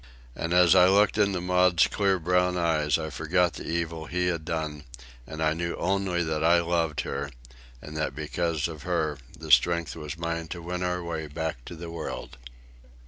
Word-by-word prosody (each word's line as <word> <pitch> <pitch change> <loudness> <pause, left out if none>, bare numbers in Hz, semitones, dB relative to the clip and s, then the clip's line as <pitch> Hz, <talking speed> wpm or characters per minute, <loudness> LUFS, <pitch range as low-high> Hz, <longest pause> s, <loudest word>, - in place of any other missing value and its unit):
And 85 - -3
as 90 -1 +6
I 90 -1 +7
looked 100 +2 +4
into 100 -3 +2
Maud's 90 -1 +4
clear 100 -2 +1
brown 90 +1 +1
eyes 75 -4 +2
I 80 -1 -5
forgot 85 +1 +1
the - - -8
evil 80 -1 -3
he 90 +1 -1
had 85 -3 -2
done, 80 -2 -4 0.4
and 80 0 -4
I 75 0 +3
knew 85 +1 -3
only 95 -1 0
that 80 -1 -2
I 85 +1 +5
loved 85 -3 0
her, 70 +1 -4 0.5
and 75 - -9
that 80 -3 -2
because 80 +1 -1
of 80 -3 -8
her 80 -4 -1 0.2
the 80 -1 -6
strength 85 +6 +4
was 75 0 -6
mine 85 0 -3
to 85 +1 -6
win 90 +1 -4
our 90 0 -1
way 80 -2 -4
back 80 -4 -4
to 85 - -8
the 85 0 -8
world. 80 -6 -6
85 Hz, 190 wpm, -27 LUFS, 80-90 Hz, 0.5 s, I